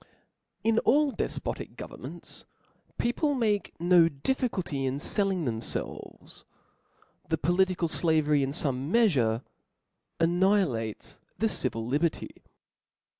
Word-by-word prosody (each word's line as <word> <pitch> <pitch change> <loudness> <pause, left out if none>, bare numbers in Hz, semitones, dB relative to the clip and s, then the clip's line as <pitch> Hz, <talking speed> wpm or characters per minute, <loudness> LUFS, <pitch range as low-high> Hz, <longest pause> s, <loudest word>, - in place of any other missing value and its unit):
In 225 0 +3
all 285 +2 +3
dcfpotic - - -4
governments - - -8 0.5
people 285 +5 +1
make 215 -8 0
no 170 -1 +5
difficulty 175 - -2
in 135 +1 -1
felling 190 +2 0
thcmfelves; 115 -2 -5 0.9
the 160 - +1
political 175 +2 +2
flavery 155 -3 +2
in 135 - 0
fome 140 -2 -1
meafure 135 - +3 0.8
annihilates 170 - +1 0.2
the 225 - +2
civil 120 - -2
liberty. 150 +7 0
170 Hz, 95 wpm, -28 LUFS, 135-205 Hz, 0.9 s, no